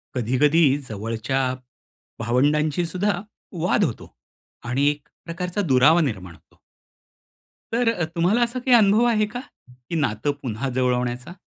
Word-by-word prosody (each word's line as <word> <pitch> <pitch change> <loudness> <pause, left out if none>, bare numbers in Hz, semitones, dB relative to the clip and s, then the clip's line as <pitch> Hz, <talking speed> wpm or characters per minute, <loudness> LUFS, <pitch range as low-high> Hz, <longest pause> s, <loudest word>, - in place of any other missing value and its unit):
कधी-कधी, 140 +7 +3 0.2
जवळच्या 115 +5 -3 0.8
भावंडांशी 145 +7 +1
सुद्धा 185 +2 -1 0.4
वाद 175 - +2
होतो - - -4 0.5
आणि 135 +4 +1
एक 150 0 -5 0.2
प्रकारचा 180 +3 -3
दुरावा 145 +6 +5
निर्माण 95 - -3
होतो. - - -27 1.1
तर 235 0 +2
अ, 175 -6 -2
तुम्हाला 180 +8 +2
असा 240 +1 0
काही 250 0 +4
अनुभव 215 +2 +4
आहे 215 -3 +2
का? 235 +4 -6 0.5
की 170 - -3
नातं 130 0 0
पुन्हा 130 +1 -3
जुळवण्याचा? 125 +2 -1
150 Hz, 125 wpm, -23 LUFS, 125-185 Hz, 1.1 s, दुरावा